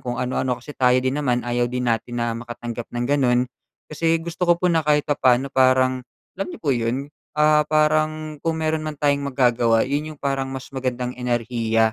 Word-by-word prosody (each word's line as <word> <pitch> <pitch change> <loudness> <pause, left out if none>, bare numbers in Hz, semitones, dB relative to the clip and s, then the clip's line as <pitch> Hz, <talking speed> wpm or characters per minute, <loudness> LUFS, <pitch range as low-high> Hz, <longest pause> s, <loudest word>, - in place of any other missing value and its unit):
kung 120 -1 -4
ano-ano. 125 0 -1
Kasi 145 - -8
tayo 125 -2 +3
din 130 +3 0
naman, 125 -4 0
ayaw 120 0 0
din 125 0 -3
natin 120 +2 -3
na 120 -1 0
makatanggap 120 -1 -6
ng 120 0 -3
ganun. 130 -3 +2 0.4
Kasi 165 +2 0
gusto 170 +2 -3
ko 175 - +6
po 180 0 +1
na 165 - +3
kahit 150 -1 +2
papaano 135 -2 +2
parang 130 -1 +3 0.4
alam 195 - -1
niyo - - -7
po 145 -4 0
yun, 125 +5 -2 0.2
ah, 150 0 +5
parang 155 0 +1
kung 165 -1 0
meron 155 0 0
man 155 - -3
tayong 145 0 +1
magagawa 120 -3 +3
yun 150 +3 -2
yung - - -36
parang 135 -1 -1
mas 135 -1 -7
magandang 125 -2 -3
enerhiya 115 -2 0
130 Hz, 190 wpm, -22 LUFS, 120-150 Hz, 0.4 s, ko